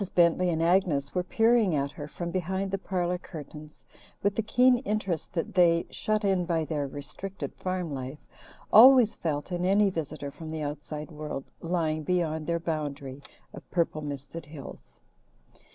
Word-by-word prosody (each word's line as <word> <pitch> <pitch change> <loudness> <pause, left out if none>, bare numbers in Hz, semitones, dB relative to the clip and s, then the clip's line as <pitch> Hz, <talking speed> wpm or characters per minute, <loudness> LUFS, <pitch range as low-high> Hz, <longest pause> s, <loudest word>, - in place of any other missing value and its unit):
Bentley 175 +1 +4
and 165 -1 0
Agnes 165 -6 +2
were 180 - +1
peeping 225 -2 +3
at 140 -1 -1
her 145 -1 -7
from 170 +2 -5
behind 190 +2 -2
the 195 - -1
parlour 180 -2 -1
curtains 155 -3 -10 0.4
with 200 0 +2
the - - +1
keen 250 +3 +4
interest 210 - -2
that 165 - -2
they 170 -2 +4
shut 215 0 0
in 190 -2 +2
by 165 -2 0
their 150 -3 -2
restricted 145 +8 -6
farm 185 -4 -3
life 130 +2 -5 0.6
always 245 0 +9
felt 150 +1 -3
in 175 0 -1
any 195 +2 +4
visitor 150 -4 -4
from 160 +2 -9
the 155 -1 -4
outside 150 +2 -5
world 150 -3 -6
lying 165 -2 0
beyond 160 -2 -1
their 170 0 0
boundary 145 -4 -4 0.3
of - - -12
purple 165 -3 0
misted 145 +2 -6
hills. 145 -2 -11
170 Hz, 160 wpm, -28 LUFS, 150-190 Hz, 0.6 s, always